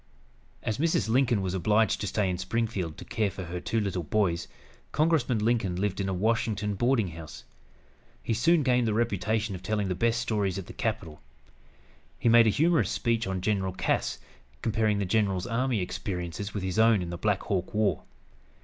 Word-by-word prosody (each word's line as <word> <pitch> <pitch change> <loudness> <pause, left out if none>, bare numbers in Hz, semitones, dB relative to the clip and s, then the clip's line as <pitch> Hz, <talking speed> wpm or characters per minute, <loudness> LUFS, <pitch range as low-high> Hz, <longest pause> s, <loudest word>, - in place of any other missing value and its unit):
As 110 +1 -2
Mrs. 155 - +1
Lincoln 120 -4 +2
was 95 -1 -2
obliged 105 +4 +2
to 105 - -2
stay 105 0 0
in 90 -1 -2
Springfield 95 -5 -2
to - - -9
care 105 -2 0
for 95 - -7
her 90 +1 -5
two 115 +4 -1
little 100 -4 -1
boys, 85 0 0 0.4
Congressman 150 -6 +2
Lincoln 105 -4 +1
lived 100 +1 -1
in 95 - -1
a - - 0
Washington 105 +1 0
boarding 115 -1 +1
house. 80 -2 -10 0.8
He 115 - -1
soon 155 +8 +3
gained 125 -2 +2
the 105 - 0
reputation 110 -1 0
of 90 - -6
telling 105 0 -1
the - - +1
best 115 +5 +1
stories 105 -5 -1
at 95 - -5
the - - -10
capital. 100 -9 -3 1.0
He 120 - +1
made 115 0 +7
a - - +6
humorous 160 +8 +2
speech 115 -3 0
on 95 -1 -2
General 95 -2 0
Cass, - - -1 0.5
comparing 110 -1 +1
the 100 - 0
general's 95 -2 +1
army 120 -2 0
experiences 90 +1 -4
with 100 - -4
his 95 +2 -1
own 110 -4 +5
in 85 - -5
the - - -4
Black 105 -3 0
Hawk 95 -2 -2
War. 105 -7 +1
105 Hz, 185 wpm, -28 LUFS, 95-115 Hz, 1.0 s, made